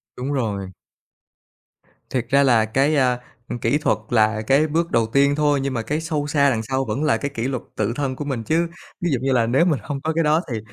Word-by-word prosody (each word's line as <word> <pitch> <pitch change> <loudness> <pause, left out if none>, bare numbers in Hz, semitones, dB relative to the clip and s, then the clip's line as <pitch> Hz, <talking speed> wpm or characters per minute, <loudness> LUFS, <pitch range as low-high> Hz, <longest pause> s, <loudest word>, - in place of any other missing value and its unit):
Đúng 130 +3 -4
rồi. 105 -8 -2 1.4
Thiệt 125 -3 -1
ra 140 +1 +4
là 120 -5 +4
cái, 135 +7 +1
a, 125 -3 +2 0.3
ừm, 120 - -4
kỹ 115 +6 +1
thuật 150 - +1
là 110 -2 +2
cái 135 +7 +3
bước 165 +2 -1
đầu 115 -1 +2
tiên 140 +4 +3
thôi, 145 -2 +2
nhưng 135 -1 -2
mà 115 - -1
cái 150 +7 -2
sâu 155 -3 -2
xa 140 -1 +3
đằng 110 -3 -1
sau 130 +3 -1
vẫn 115 +7 -2
là 155 - +2
cái 145 - -4
kỷ 115 +3 -2
luật 130 -3 -3
tự 110 +2 -1
thân 135 -3 -2
của 145 - -5
mình 130 -5 -3
chứ. 165 +8 +1 0.3
Ví 175 -3 0
dụ 130 - +1
như 135 - 0
là 120 -2 +3
nếu 135 +8 +3
mình 160 -6 +1
hông 140 -2 -5
có 160 +2 -1
cái 165 +1 +1
đó 155 +2 +3
thì 115 - -2
135 Hz, 245 wpm, -22 LUFS, 115-150 Hz, 1.4 s, ra